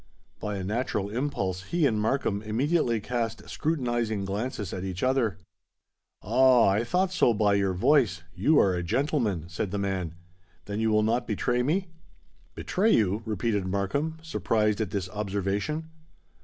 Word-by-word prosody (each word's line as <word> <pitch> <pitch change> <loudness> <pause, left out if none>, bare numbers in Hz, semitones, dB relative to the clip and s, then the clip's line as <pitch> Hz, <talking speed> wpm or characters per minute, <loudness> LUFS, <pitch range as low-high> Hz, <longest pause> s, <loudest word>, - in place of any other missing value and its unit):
By 105 -1 -3
a 95 - -4
natural 105 -1 -2
impulse 100 -8 -2
he 170 - +1
and 110 -5 +1
Markham 110 -3 0
immediately 120 +3 +1
cast 115 0 -3
scrutinising 120 -9 -1
glances 105 0 -3
at 95 - -4
each 95 -1 -4
other. 130 -7 +1 0.9
"Ah! 130 -4 +5
I 100 +4 +2
thought 180 +8 +1
so 120 -10 +3
by 105 -1 +3
your 100 -2 +1
voice—you 95 - +2
are 95 - +4
a 90 - -1
gentleman," 110 - 0
said 90 +3 -3
the 100 - -3
man: 95 -4 -2 0.5
"then 100 +1 -4
you 110 0 +2
will 105 0 +3
not 115 +2 0
betray 120 +3 0
me?" 170 +8 0 0.7
"Betray 210 +5 +1
you!" 105 0 +1
repeated 105 -2 -1
Markham, 100 +12 -1
surprised 110 -9 0
at 105 - -1
this 95 -2 -3
observation. 105 - -2
110 Hz, 150 wpm, -27 LUFS, 100-130 Hz, 0.9 s, Ah